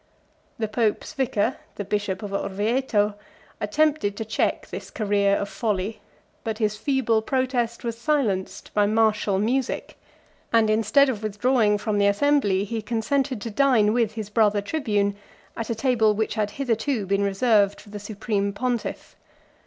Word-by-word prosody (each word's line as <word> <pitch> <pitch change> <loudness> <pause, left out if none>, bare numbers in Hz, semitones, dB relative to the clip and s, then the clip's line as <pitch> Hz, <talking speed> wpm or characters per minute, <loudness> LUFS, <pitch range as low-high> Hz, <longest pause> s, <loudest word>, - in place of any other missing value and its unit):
The 220 - -1
pope's 215 0 -1
vicar, 260 -4 0 0.2
the 205 - -5
bishop 205 -1 -2
of 200 -1 -5
Orvieto, 210 +2 0 0.5
attempted 300 -9 +1
to 225 - -3
check 215 -1 -1
this - - -7
career 200 -2 +1
of 200 - -2
folly; 210 -1 -2 0.4
but 220 -1 -3
his 215 -1 0
feeble 230 -1 +1
protest 250 -1 -1
was 230 -1 -4
silenced 235 -10 -1
by 205 -1 +3
martial 215 -2 +2
music; 240 +6 -1 0.5
and 225 -2 +4
instead 225 +6 +4
of 235 -6 -2
withdrawing 215 0 +2
from 205 0 -1
the 200 - +4
assembly, 205 -3 +2
he 220 +2 -3
consented 250 +4 -1
to 230 - -5
dine 220 -3 +3
with 230 -3 +1
his 215 -2 -6
brother 210 -2 +3
tribune, 205 -4 -1 0.4
at 230 - -4
a 230 - 0
table 225 -3 +2
which 220 +1 -1
had 210 -1 -1
hitherto 235 -3 0
been 200 +1 +1
reserved 200 0 +2
for 205 - -15
the 210 - -6
supreme 205 -1 -2
pontiff. 245 +1 -3
220 Hz, 155 wpm, -24 LUFS, 205-240 Hz, 0.5 s, and